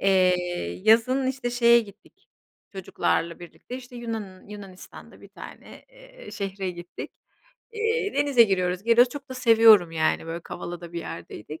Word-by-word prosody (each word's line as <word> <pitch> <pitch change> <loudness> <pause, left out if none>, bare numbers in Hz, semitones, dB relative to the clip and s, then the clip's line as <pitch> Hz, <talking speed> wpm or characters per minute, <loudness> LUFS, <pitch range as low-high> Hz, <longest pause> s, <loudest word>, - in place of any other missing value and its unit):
Eee, 185 -2 +4 0.5
yazın, 245 +4 +3
işte, 260 -2 -3
şeye 235 -1 +5
gittik 205 -3 -16 0.4
çocuklarla 170 -3 -2
birlikte, 175 +8 -10
işte, 250 -1 -12
Yunan 220 -6 -7
Yunanistan'da 200 -3 -12
bir - - -15
tane, - - -13
eee, - - -19
eee, - - -10
şehre 195 -1 -4
gittik. 175 0 -9 0.6
Eee, 445 -1 -1
denize 285 -4 +4
giriyoruz, 185 -3 0
geliyoruz, 235 +2 +4
çok 285 -1 -9
da 260 - -5
seviyorum, 225 -7 +5
yani, 160 0 0
böyle, 165 +1 -5
Kavala'da 175 0 -8
bir 170 - -4
yerdeydik. 105 - -9
210 Hz, 145 wpm, -25 LUFS, 180-250 Hz, 0.6 s, şeye